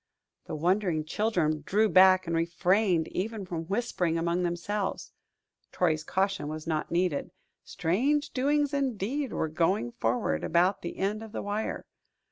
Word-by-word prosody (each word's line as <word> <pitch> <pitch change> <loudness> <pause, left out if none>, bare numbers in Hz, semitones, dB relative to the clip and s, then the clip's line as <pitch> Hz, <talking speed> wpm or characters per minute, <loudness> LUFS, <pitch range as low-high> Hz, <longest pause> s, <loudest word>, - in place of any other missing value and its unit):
The 165 - -5
wondering 175 -1 +1
children 170 -5 0
drew 215 +7 +2
back 185 -1 +6
and 165 0 -2
refrained 175 +1 +2
even 210 +1 -3
from 165 -2 -4
whispering 185 -4 -1
among 170 +2 0
themselves 180 +3 -2 0.6
Troy's 155 -3 +1
caution 190 0 -1
was 155 +1 -6
not 155 -2 -2
needed. 170 -4 0 0.3
Strange 270 - 0
doings, 290 +2 +1
indeed, 265 0 -1
were - - -1
going 160 - 0
forward 115 -10 -1
about 175 +4 +2
the 170 - -6
end 205 +3 -1
of 220 -1 -10
the - - -4
wire. 205 +2 -3
185 Hz, 140 wpm, -28 LUFS, 165-210 Hz, 0.6 s, back